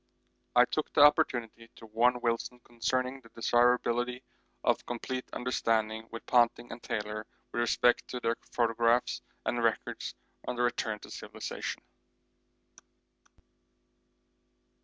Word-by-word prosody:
I 125 0 +8
took 155 +4 -2
the - - +7
opportunity 115 -5 +3
to 115 - -12
warn 120 +3 +2
Wilson 120 +1 -1
concerning 130 +2 -2
the 115 - -17
desirability 120 +1 +2 0.4
of - - +2
complete 125 +2 -4
understanding 110 -3 0
with 115 - -8
Ponting 120 -1 +3
and 115 +1 -8
Taylor 105 0 -4 0.2
with 120 - -1
respect 120 +1 +3
to 125 - -4
their 115 -1 0 0.2
photographs 115 0 +2 0.2
and - - 0
records - - -1 0.3
on - - -2
their 120 0 +2
return 115 -3 -1
to - - -11
civilisation. - - -5
120 Hz, 115 wpm, -30 LUFS, 115-125 Hz, 0.4 s, I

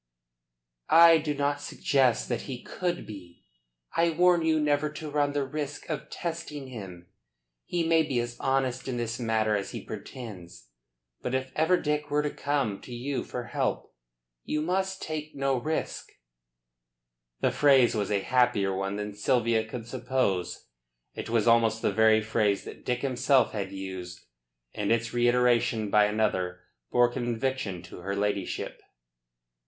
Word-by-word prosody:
"I 165 0 +8
do 150 -1 -2
not 145 0 0
suggest 135 -4 +1
that - - -2
he 125 -2 -6
could 175 -1 -3
be. 90 -5 -11 0.5
I 170 0 +3
warn 175 +1 +4
you 160 -1 +2
never 150 0 +1
to 155 -1 -6
run 145 -1 +1
the 145 -1 0
risk 145 +1 -5
of 150 - -4
testing 160 -5 -5
him. 95 -8 -9 0.6
He 175 -2 -1
may 165 -1 +5
be 140 -6 0
as 120 0 -3
honest 135 -1 0
in 125 -2 -2
this 120 0 -3
matter 110 -2 +1
as 100 -1 -3
he - - -6
pretends. 90 - -9 0.5
But 125 - -2
if 130 0 -2
ever 160 +4 +3
Dick 150 0 -1
were 150 +1 +1
to 150 - -1
come 140 -8 -1
to - - -11
you 130 +3 -3
for 125 - -5
help, - - -2 0.5
you 150 0 -1
must 190 +3 -1
take 155 -1 -5
no 135 -1 +1
risk." 155 +6 -3 1.3
The - - +3
phrase 135 -4 +5
was 105 -3 -1
a 100 -2 +1
happier 100 -5 +2
one 95 +1 -2
than 105 0 -4
Sylvia 115 +1 +2
could 115 0 -6
suppose. 120 -7 -1 0.5
It - - -6
was 115 -1 +1
almost 115 -1 +4
the - - +2
very 110 +1 +5
phrase 105 -2 +1
that - - -10
Dick 125 +2 -2
himself 135 0 +3
had 100 -3 -4
used; 95 -2 -7 0.5
and 105 0 -1
its 115 0 +1
reiteration 120 -3 +2
by 105 0 +6
another 95 -4 0 0.3
bore 120 0 +4
conviction 120 -6 -2
to 85 - -11
her 100 +3 -3
ladyship. 100 -1 -2
120 Hz, 155 wpm, -28 LUFS, 105-145 Hz, 1.3 s, I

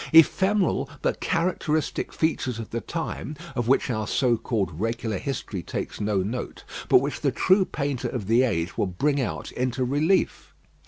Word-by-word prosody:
Ephemeral 175 -3 +4
but - - 0
characteristic 165 -3 0
features 140 -6 0
of 115 -2 -7
the 115 - -2
time 165 -2 -4 0.2
of 120 -2 -1
which 135 - +3
our 110 -2 -2
so 125 -3 +2
called 110 -8 -2
regular 115 -2 -1
history 115 -8 -4
takes - - -5
no 100 -2 +1
note, 115 +6 -5 0.3
but - - +8
which 140 +2 -3
the 140 - +2
true 185 +8 +4
painter 140 -6 -2
of 120 -6 -4
the 115 +5 +4
age 95 -9 0
will - - +2
bring 140 +11 +1
out 120 - -3
into 125 0 -1
relief. 150 +9 +1
130 Hz, 165 wpm, -25 LUFS, 110-150 Hz, 0.3 s, but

